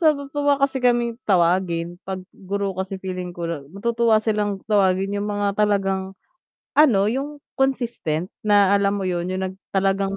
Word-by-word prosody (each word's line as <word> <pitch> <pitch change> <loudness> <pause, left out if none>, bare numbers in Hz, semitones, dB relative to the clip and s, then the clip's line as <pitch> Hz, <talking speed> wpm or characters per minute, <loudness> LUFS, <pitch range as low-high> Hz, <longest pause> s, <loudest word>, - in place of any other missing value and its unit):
natutuwa 285 -2 +2
kasi 275 -1 0
kaming 240 -1 +1
tawagin 175 -1 +1
'pag 190 -1 -4
guro 200 +1 -3
kasi 190 +1 -4
feeling 185 -2 -6
ko 170 - -4
la 165 -3 -3
matutuwa 230 +5 +1
silang 210 -3 -1
tawagin 195 -2 +2
yung 205 +1 -2
mga 205 0 -1
talagang, 195 -2 0 0.6
ano 275 -9 +5
yung 280 +3 -3 0.2
consistent 235 - -1
na 205 -2 +4
alam 200 0 +2
mo 195 - -3
'yun, 175 -1 -1
yung 185 0 -2
nag - - -16
talagang 195 0 0
200 Hz, 155 wpm, -22 LUFS, 185-235 Hz, 0.6 s, ano